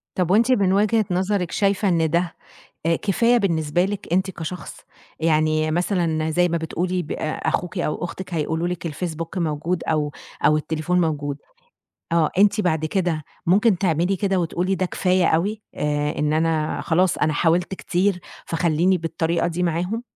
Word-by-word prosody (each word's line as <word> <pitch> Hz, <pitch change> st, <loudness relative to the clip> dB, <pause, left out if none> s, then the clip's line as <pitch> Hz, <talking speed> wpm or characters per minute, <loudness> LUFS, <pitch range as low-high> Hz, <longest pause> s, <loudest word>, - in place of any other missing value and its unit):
طب 180 Hz, -1 st, 0 dB
وأنتِ 230 Hz, +5 st, +4 dB
من 195 Hz, -6 st, +3 dB
وجهة 215 Hz, +2 st, +3 dB
نظرِك 185 Hz, -1 st, 0 dB
شايفة 200 Hz, 0 st, +1 dB
إن 165 Hz, -2 st, +2 dB
ده 170 Hz, +2 st, 0 dB, 0.5 s
آآ، 165 Hz, 0 st, +3 dB
كفاية 230 Hz, +6 st, +2 dB
بالنسبة 170 Hz, -4 st, +1 dB
لِك 195 Hz, -4 st, -4 dB
أنتِ 190 Hz, +1 st, +1 dB
كشخص، 175 Hz, +1 st, -7 dB, 0.4 s
يعني 155 Hz, -1 st, +2 dB
مثلًا 165 Hz, -2 st, 0 dB
زي 180 Hz, +3 st, +3 dB
ما 170 Hz, -, 0 dB
بتقولي 180 Hz, +3 st, -2 dB
ب 150 Hz, -, -9 dB
أخوكِ 175 Hz, +4 st, -2 dB
أو 160 Hz, -2 st, -2 dB
أختِك 180 Hz, +1 st, -6 dB
هيقولوا 160 Hz, +1 st, -1 dB
لِك 175 Hz, -1 st, -3 dB
الFacebook 165 Hz, +2 st, -5 dB
موجود 165 Hz, +1 st, -1 dB
أو 150 Hz, -2 st, 0 dB, 0.3 s
أو 150 Hz, -, +5 dB
التليفون 160 Hz, +3 st, 0 dB
موجود. 145 Hz, -3 st, -1 dB, 0.8 s
آه، 165 Hz, -2 st, +3 dB
أنتِ 210 Hz, +1 st, +4 dB
بعد 160 Hz, -5 st, 0 dB
كده 165 Hz, -1 st, -1 dB, 0.2 s
ممكن 195 Hz, +2 st, +4 dB
تعملي 175 Hz, +1 st, +1 dB
كده 190 Hz, 0 st, 0 dB
وتقولي 175 Hz, +3 st, -1 dB
ده 185 Hz, -1 st, -1 dB
كفاية 185 Hz, 0 st, +1 dB
أوي، 205 Hz, +7 st, 0 dB
آآ، 150 Hz, 0 st, -1 dB
إن 150 Hz, 0 st, +1 dB
أنا 160 Hz, -1 st, 0 dB
خلاص 180 Hz, +2 st, +1 dB
أنا 155 Hz, -, +2 dB
حاولت 175 Hz, +4 st, +1 dB
كتير 180 Hz, +1 st, 0 dB, 0.3 s
فخلّيني 170 Hz, +2 st, +2 dB
بالطريقة 165 Hz, 0 st, -1 dB
دي 175 Hz, +1 st, -2 dB
معاهم؟ 180 Hz, +7 st, -1 dB
175 Hz, 160 wpm, -22 LUFS, 160-185 Hz, 0.8 s, أو